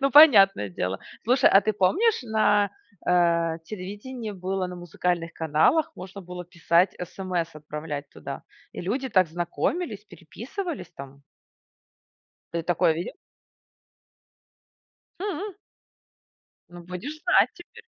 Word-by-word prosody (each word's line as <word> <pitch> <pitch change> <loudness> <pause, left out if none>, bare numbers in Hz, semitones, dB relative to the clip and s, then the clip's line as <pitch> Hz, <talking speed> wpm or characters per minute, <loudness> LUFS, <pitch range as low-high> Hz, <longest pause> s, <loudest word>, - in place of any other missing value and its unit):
Ну, 275 0 +2
понятное 200 - +8
дело. 90 +1 -3 0.3
Слушай, 250 +3 +5
а 195 - +7
ты 215 - 0
помнишь, 335 - +2
на, 215 -3 +3 0.4
э, 170 -2 +3
телевидении 215 +5 -6
было 190 -1 -2
на 180 0 -7
музыкальных 175 -1 -2
каналах 160 - +2
можно 190 +2 -8
было 180 -1 -8
писать 170 +1 +2
СМС, 180 -2 -3
отправлять 150 -1 -6
туда, - - -7 0.3
и - - -6
люди 250 +9 -2
так 185 -7 +3
знакомились, 205 - -2
переписывались 230 - -7
там. 140 +1 -11 1.3
Ты 170 0 -2
такое 165 -1 +2
видел? 170 +3 -5 2.0
Хм. 400 0 -4 1.1
Ну, 175 0 -11
будешь 185 - -7
знать 370 +1 +4
теперь. 460 +6 -15
185 Hz, 115 wpm, -26 LUFS, 170-245 Hz, 2.0 s, понятное